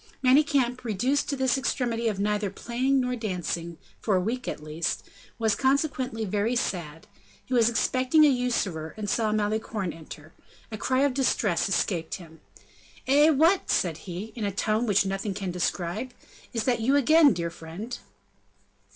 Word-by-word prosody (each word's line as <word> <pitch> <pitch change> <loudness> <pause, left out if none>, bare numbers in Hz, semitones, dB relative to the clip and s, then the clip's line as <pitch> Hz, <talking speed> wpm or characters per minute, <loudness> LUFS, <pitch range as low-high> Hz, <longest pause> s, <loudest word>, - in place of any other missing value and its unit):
Manicamp, 260 -2 +3
reduced 245 +6 0
to 285 - 0
this 265 0 +1
extremity 235 -2 -1
of 210 -3 -1
neither 210 0 0
playing 255 +7 0
nor 250 -1 -1
dancing, 175 -6 -4 0.2
for 210 - +1
a - - +3
week 235 +7 -3
at - - -3
least, 155 +2 -3 0.3
was, 220 -2 +2
consequently, 260 -2 0
very 210 +4 0
sad; 165 -8 -3 0.4
he 255 - -5
was 235 -2 +5
expecting 255 +6 +3
a - - +7
usurer, 225 - -1
and 210 -1 -4
saw 220 +1 +1
Malicorne 210 -2 -1
enter. 155 -1 -12 0.4
A 215 - -4
cry 260 +4 +1
of 280 -2 +2
distress 215 -9 +1
escaped 175 -3 -1
him. 160 -3 -13 0.6
"Eh! 290 +4 +5
what!" 325 +6 +3
said 165 -4 +1
he, 190 +6 -6
in 230 - -4
a 200 - 0
tone 215 +4 0
which 200 -1 +3
nothing 195 +1 -3
can 195 -2 -3
describe, 180 +7 -2 0.4
"is 230 -2 -1
that 240 -2 +1
you 265 +5 +3
again, 295 +2 +6
dear 170 -4 -2
friend?" 170 +9 -7
220 Hz, 160 wpm, -26 LUFS, 185-255 Hz, 0.6 s, a